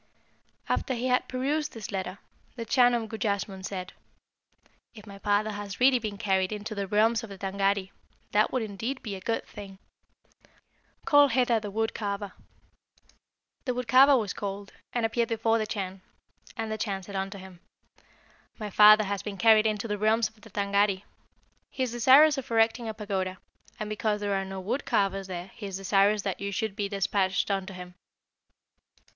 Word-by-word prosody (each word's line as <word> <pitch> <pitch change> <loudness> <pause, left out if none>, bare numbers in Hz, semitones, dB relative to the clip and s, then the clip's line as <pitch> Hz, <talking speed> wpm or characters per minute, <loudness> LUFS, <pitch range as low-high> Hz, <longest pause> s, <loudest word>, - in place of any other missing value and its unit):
"After 260 - -1
he 250 +2 -2
had 250 0 +2
perused 290 +4 -1
this 220 -3 -7
letter, 190 -1 -4 0.4
the 230 -2 -5
Chan 245 0 +4
of 230 -2 -2
Gujassmunn 200 -3 -3
said, 185 -2 -5 1.0
'If 210 -2 -12
my 200 -1 -11
father 205 +1 +1
has 205 -1 -7
really 255 0 +5
been 215 -3 -5
carried 190 -1 0
into 215 +1 -5
the 200 -2 -3
realms 220 +3 +2
of 225 - -8
the 195 - -9
Tângâri, 195 0 -1 0.4
that 210 +1 +3
would 255 -3 0
indeed 225 +6 -5
be 210 - -5
a 190 - -9
good 225 +4 -2
thing. 200 -2 -10 1.3
Call 290 -3 +6
hither 245 -2 +2
the 210 -1 -6
wood 220 +2 -1
carver.' 200 -2 -4 1.3
The 250 -2 -1
wood 250 -1 -3
carver 265 +3 +7
was 210 -5 -2
called, 200 0 -6 0.2
and 240 -2 0
appeared 230 +1 0
before 225 0 +1
the 215 - -2
Chan, 190 -2 -5 0.6
and 225 -1 -3
the 220 - -3
Chan 195 -3 -3
said 200 +1 -9
unto 195 +1 -3
him, 190 -2 -12 1.0
'My 210 -3 -6
father 215 +2 +8
has 200 -1 -3
been 205 -2 -6
carried 220 +1 +5
into 215 +1 -2
the 210 -1 -3
realms 220 +2 +3
of 215 -1 -26
the 225 - -14
Tângâri. 200 -1 +1 0.7
He 260 - -3
is 250 - -2
desirous 270 +5 +6
of 260 - -9
erecting 225 0 +2
a 220 - -5
pagoda, 190 -3 -3 0.4
and 215 - -3
because 215 0 -1
there 205 -1 -1
are 195 0 -1
no 190 0 -6
wood 230 +9 -2
carvers 195 -1 0
there 180 0 -6
he 205 - -7
is 190 -1 -5
desirous 195 +1 +2
that 195 -2 -3
you 200 0 -3
should 215 0 -2
be 200 -2 -2
despatched 195 0 0
unto 195 0 -2
him.' 180 0 -9
210 Hz, 180 wpm, -28 LUFS, 195-225 Hz, 1.3 s, father